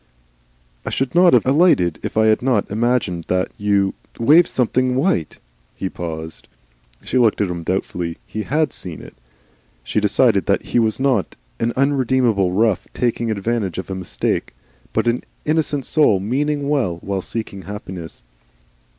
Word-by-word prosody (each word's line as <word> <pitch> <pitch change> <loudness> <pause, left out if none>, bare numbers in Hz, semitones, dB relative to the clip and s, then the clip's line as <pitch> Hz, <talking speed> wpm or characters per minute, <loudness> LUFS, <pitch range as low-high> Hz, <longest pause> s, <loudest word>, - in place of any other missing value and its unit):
"I - - -4
should 135 -1 -2
not 175 -1 +6
have 120 - +4
alighted 130 - +3
if - - -5
I 110 - +4
had 110 -1 +3
not 125 -7 0
imagined 105 -6 0
that 90 0 0
you 100 -1 +2 0.3
er, - - -3
waved 160 +7 +6
something 125 0 +1
white 130 - 0 0.2
" - - -39
He 95 - -3
paused. 80 -2 -7 0.6
She 130 - 0
looked 115 -3 +3
at 100 -3 0
him 85 -1 -4
doubtfully. 85 -1 -3
He 110 - -5
HAD 150 +4 0
seen 85 -4 -6
it! - - -12 0.7
She - - 0
decided 105 -2 +2
that - - +2
he - - 0
was 110 0 +1
not 130 -7 +1 0.2
an 115 - 0
unredeemed 130 -3 +2
rough 100 +2 +1
taking 120 -1 0
advantage 105 -2 -2
of 95 +1 -5
a - - -1
mistake, 95 -8 -2 0.4
but - - 0
an 120 +1 +1 0.2
innocent 150 -3 0
soul 145 -11 +3
meaning 140 +7 -1
well 130 - 0
while 100 -1 -3
seeking 105 -1 -5
happiness. 95 - -8
110 Hz, 160 wpm, -20 LUFS, 95-130 Hz, 0.7 s, not